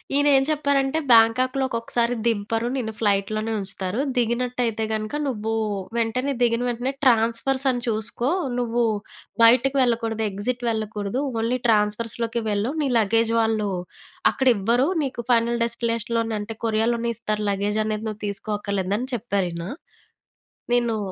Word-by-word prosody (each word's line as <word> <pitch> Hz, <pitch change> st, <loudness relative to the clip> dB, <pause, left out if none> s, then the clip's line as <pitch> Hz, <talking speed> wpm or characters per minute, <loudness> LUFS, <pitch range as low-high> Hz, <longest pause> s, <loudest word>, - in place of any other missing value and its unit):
ఈయన 285 Hz, +1 st, +4 dB
ఏం 270 Hz, -, +3 dB
చెప్పారంటే, 285 Hz, -1 st, +1 dB
"బ్యాంకాక్‌లో 255 Hz, +4 st, +4 dB
ఒకొక్కసారి 235 Hz, 0 st, 0 dB
దింపరు, 225 Hz, +1 st, 0 dB
నిన్ను 225 Hz, -4 st, -3 dB
ఫ్లైట్‌ 200 Hz, -2 st, +1 dB
లోనే 220 Hz, +1 st, -2 dB
ఉంచుతారు. 195 Hz, +2 st, -4 dB, 0.2 s
దిగినట్టయితే 240 Hz, -1 st, 0 dB
గనుక 215 Hz, +4 st, -2 dB
నువ్వు 225 Hz, -3 st, -2 dB, 0.4 s
వెంటనే, 250 Hz, +5 st, 0 dB
దిగిన 235 Hz, 0 st, +2 dB
వెంటనే, 245 Hz, +2 st, -1 dB
ట్రాన్స్‌ఫర్స్ 235 Hz, +3 st, +2 dB
అని 245 Hz, -, -3 dB
చూసుకో, 225 Hz, +3 st, -1 dB, 0.3 s
నువ్వు 240 Hz, 0 st, 0 dB, 0.6 s
బయటకెళ్ళకూడదు. 235 Hz, -2 st, +3 dB
ఎగ్జిట్ 235 Hz, +5 st, -3 dB
వెళ్ళకూడదు. 215 Hz, +2 st, -2 dB, 0.2 s
ఓన్లీ 240 Hz, +3 st, 0 dB
ట్రాన్స్‌ఫర్స్‌ 210 Hz, 0 st, +1 dB
లోకే 230 Hz, +1 st, -2 dB
వెళ్ళు, 205 Hz, +5 st, 0 dB
నీ 275 Hz, -, 0 dB
లగేజ్ 225 Hz, +2 st, +2 dB
వాళ్ళు 220 Hz, -2 st, 0 dB, 0.6 s
అక్కడ 265 Hz, -1 st, -1 dB
ఇవ్వరు. 235 Hz, +8 st, +2 dB, 0.2 s
నీకు 255 Hz, -3 st, -4 dB
ఫైనల్ 235 Hz, 0 st, +2 dB
డెస్టినేషన్‌‌ 230 Hz, -1 st, -2 dB
లోనే 225 Hz, -1 st, -1 dB
అంటే, 220 Hz, +2 st, -6 dB
కొరియాలోనే 230 Hz, +1 st, +1 dB
ఇస్తారు. 215 Hz, -2 st, -2 dB
లగేజ్ 205 Hz, +2 st, -1 dB
అనేది 215 Hz, 0 st, -3 dB
నువ్వు 215 Hz, +1 st, -8 dB
తీసుకోక్కర్లేదు" 200 Hz, -1 st, -2 dB
అని 255 Hz, +2 st, -3 dB
చెప్పారు 200 Hz, -5 st, -1 dB
ఈయన. 170 Hz, +1 st, -5 dB, 1.1 s
నేను 235 Hz, -2 st, +1 dB
230 Hz, 135 wpm, -23 LUFS, 215-245 Hz, 1.1 s, ఈయన